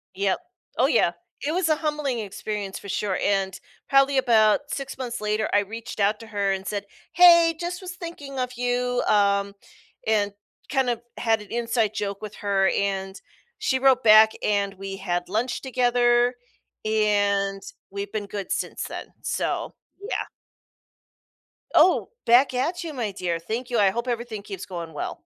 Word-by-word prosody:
Yep. 195 0 +1 0.4
Oh - - +4
yeah. - - +3 0.3
It 305 - 0
was 355 -2 +1
a 310 - +4
humbling 300 -5 -2
experience 205 -1 -5
for 200 - -10
sure 195 -1 -1
and 195 -2 +1 0.3
probably 275 0 +4
about 225 -3 +4
6 275 -1 -5
months 240 -3 -4
later, 215 +1 0
I 205 - +6
reached 220 +2 -6
out 210 +2 +2
to 225 - -11
her 200 -2 0
and 195 0 -3
said, 205 -1 -2 0.3
"Hey, 340 -2 +7
just 355 +2 -4
was 370 0 -6
thinking 295 -6 -8
of 250 0 -1
you," 245 0 0
um, 200 -1 +2 0.5
and 205 -2 +1 0.4
kind 265 -3 +2
of 235 -1 -1 0.2
had 225 -2 +1
an 210 - -11
inside 230 -2 0
joke 200 0 -3
with 210 -1 -7
her, 195 -1 +1
and 195 -1 -2 0.4
she 260 -1 0
wrote 260 -1 +4
back 220 0 +8
and 200 -1 +1
we 195 0 -6
had 175 -2 -2
lunch 230 +5 -1
together, 245 -1 +2 0.5
and 205 -2 +1 0.3
we've 200 +1 -5
been 215 -2 -3
good 200 -1 -6
since - - -2
then, - - -6
so, - - -2 0.3
yeah. 420 - -3 1.5
Oh, 370 - +5 0.2
back 250 +3 +5
at 335 +8 -1
you, 320 -3 -5
my 230 -6 -2
dear, 175 -3 -2
thank 230 +9 -4
you, 240 - 0
I 195 -2 +4
hope 235 +3 -3
everything 235 -3 -3
keeps 195 -2 -7
going 170 -3 -7
well. - - -4
220 Hz, 165 wpm, -25 LUFS, 200-255 Hz, 1.5 s, back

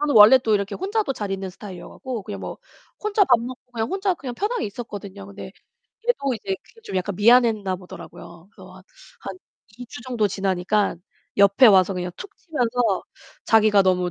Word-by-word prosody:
저는 295 -3 0
원래 215 +5 +9
또 225 -4 +1
이렇게 200 0 -1
혼자도 405 -3 -1
잘 205 -2 -4
있는 190 -1 -4
스타일이어가고 205 +5 -8
그냥 205 0 -6
뭐 - - -7 0.4
혼자 425 -1 +2
밥 235 -10 +4
먹고 250 +1 -9
그냥 225 -1 -2
혼자 385 -1 0
그냥 255 -6 -7
편하게 435 - -1
있었거든요. 200 -3 -8
근데 200 -1 -9 0.6
얘도 280 - +1
이제 195 -3 -3
그게 455 - -21
좀 195 - -8
약간 185 +1 -2
미안했나 215 -3 +4
보더라고요. 175 -1 -12
그래서 - - -14 0.4
한 - - -7 0.4
2 245 - -7
주 245 - -10
정도 240 -4 0
지나니까 190 +1 0 0.4
옆에 200 +6 +6
와서 195 -3 +5
그냥 180 0 -3
툭 405 +1 -10
치면서 245 - 0 0.4
자기가 215 -2 +5
너무 180 -1 +1
215 Hz, 380 characters per minute, -23 LUFS, 195-255 Hz, 0.6 s, 원래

